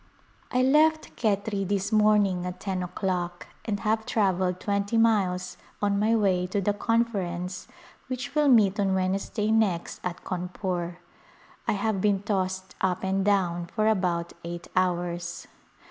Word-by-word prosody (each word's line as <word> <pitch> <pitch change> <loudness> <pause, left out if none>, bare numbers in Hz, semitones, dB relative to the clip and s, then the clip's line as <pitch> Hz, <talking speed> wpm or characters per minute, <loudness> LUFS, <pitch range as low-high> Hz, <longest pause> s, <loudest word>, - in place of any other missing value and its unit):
I 255 0 +2
left 310 +4 +3
Khetri 200 -2 0
this 200 +1 -1
morning 210 -4 +3
at 180 0 -6
ten 190 -2 -2
o'clock 180 -1 -3 0.2
and 205 -3 -2
have 220 +1 +1
travelled 185 -4 +1
twenty 200 +3 0
miles 185 -6 +2 0.2
on 200 -1 +1
my 220 +2 +3
way 185 -4 +2
to 195 +3 -1
the 205 +1 +1
Conference 195 -5 -1 0.4
which 255 0 -4
will 300 -1 +3
meet 215 -6 +5
on 195 -1 +2
Wednesday 195 +3 0
next 205 -6 +1
at 180 -1 -4
Cawnpore. 180 -1 -3 0.7
I - - +3
have 205 -1 -1
been 200 -1 +2
tossed 190 -2 -2
up 185 0 0
and 190 0 +1
down 180 -4 +1
for 215 +4 0
about 180 -5 0
eight 170 +1 -6
hours. 175 -1 -1
195 Hz, 145 wpm, -27 LUFS, 180-215 Hz, 0.7 s, meet